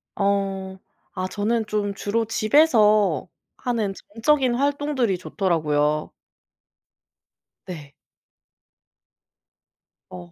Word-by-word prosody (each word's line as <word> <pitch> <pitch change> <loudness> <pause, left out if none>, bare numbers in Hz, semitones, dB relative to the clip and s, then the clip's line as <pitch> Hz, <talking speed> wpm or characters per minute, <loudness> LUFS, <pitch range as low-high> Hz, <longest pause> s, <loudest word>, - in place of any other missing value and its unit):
어. 195 -1 -1 0.4
아 185 0 -3
저는 220 +3 -1
좀 210 -1 -2
주로 225 +3 -1
집에서 215 - +3 0.3
하는 225 -5 -2 0.2
정적인 260 0 +3
활동들이 280 -6 0
좋더라고요. 155 -5 0 1.5
네. 150 -6 -9 2.2
어 90 -1 -10
205 Hz, 150 characters per minute, -23 LUFS, 185-230 Hz, 2.2 s, 집에서